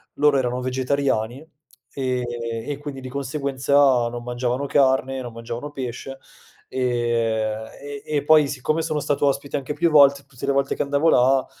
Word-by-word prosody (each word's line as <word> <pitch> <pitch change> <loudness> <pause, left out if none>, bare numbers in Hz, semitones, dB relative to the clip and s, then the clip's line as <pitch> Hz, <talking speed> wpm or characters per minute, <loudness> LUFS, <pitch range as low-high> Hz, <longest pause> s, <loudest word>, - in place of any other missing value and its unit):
loro 145 -1 +4
erano 125 -1 -1
vegetariani 130 0 -1 0.5
e 130 -2 -1 0.5
e 145 - -2
quindi 145 -2 -7
di 130 - -7
conseguenza 140 0 -3 0.4
non 120 0 -6
mangiavano 125 +2 -2
carne, 135 -1 +2
non 120 -2 -7
mangiavano 115 +5 -6
pesce, 135 0 -6 0.5
e 115 -3 0 0.3
e 145 0 -8
e 145 - +1
poi 155 -1 +6
siccome 145 +4 -1
sono 155 -2 -1
stato 145 0 0
ospite 140 +1 -1
anche 140 +1 -4
più 170 +3 +2
volte, 140 -2 +5
tutte 135 -1 -8
le 140 - +2
volte 140 0 0
che - - 0
andavo 145 +3 +2
là, 130 -1 +4
135 Hz, 160 wpm, -23 LUFS, 125-140 Hz, 0.5 s, poi